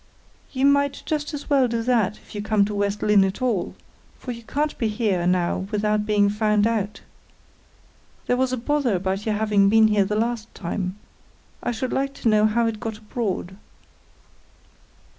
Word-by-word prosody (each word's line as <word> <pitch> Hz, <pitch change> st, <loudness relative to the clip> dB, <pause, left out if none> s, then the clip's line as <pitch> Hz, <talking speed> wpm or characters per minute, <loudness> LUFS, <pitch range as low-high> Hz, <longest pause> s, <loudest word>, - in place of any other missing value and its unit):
"You 265 Hz, 0 st, 0 dB
might 280 Hz, 0 st, +2 dB
just 300 Hz, -1 st, -2 dB
as 290 Hz, -2 st, -6 dB
well 275 Hz, -3 st, +3 dB
do 230 Hz, -1 st, -2 dB
that, 225 Hz, -4 st, +1 dB
if -, -, -17 dB
you 205 Hz, -, -4 dB
come 210 Hz, -1 st, +2 dB
to 210 Hz, -, -4 dB
West 205 Hz, 0 st, -1 dB
Lynne 210 Hz, -2 st, +5 dB
at 195 Hz, 0 st, -2 dB
all; 240 Hz, -8 st, -1 dB, 0.4 s
for 250 Hz, -, -6 dB
you 235 Hz, -1 st, -7 dB
can't 295 Hz, +6 st, -2 dB
be 230 Hz, -, +1 dB
here 210 Hz, -5 st, 0 dB
now 180 Hz, +1 st, 0 dB
without 210 Hz, 0 st, 0 dB
being 205 Hz, -1 st, +3 dB
found 210 Hz, 0 st, +2 dB
out. 215 Hz, -2 st, -1 dB, 1.2 s
There 245 Hz, -, +1 dB
was 260 Hz, 0 st, 0 dB
a 255 Hz, -, -1 dB
bother 260 Hz, -2 st, 0 dB
about 190 Hz, +3 st, -2 dB
your 215 Hz, -, +1 dB
having 210 Hz, -2 st, +3 dB
been 220 Hz, +1 st, +5 dB
here 210 Hz, -1 st, +3 dB
the 210 Hz, +2 st, -2 dB
last 230 Hz, 0 st, -2 dB
time: 185 Hz, +1 st, -4 dB, 0.6 s
I -, -, -2 dB
should 245 Hz, +2 st, -3 dB
like 275 Hz, 0 st, -1 dB
to 230 Hz, -, 0 dB
know 215 Hz, 0 st, +4 dB
how 230 Hz, +2 st, +1 dB
it 225 Hz, -2 st, -2 dB
got 220 Hz, -1 st, -5 dB
abroad." 210 Hz, -4 st, -4 dB
215 Hz, 180 wpm, -23 LUFS, 205-240 Hz, 1.2 s, Lynne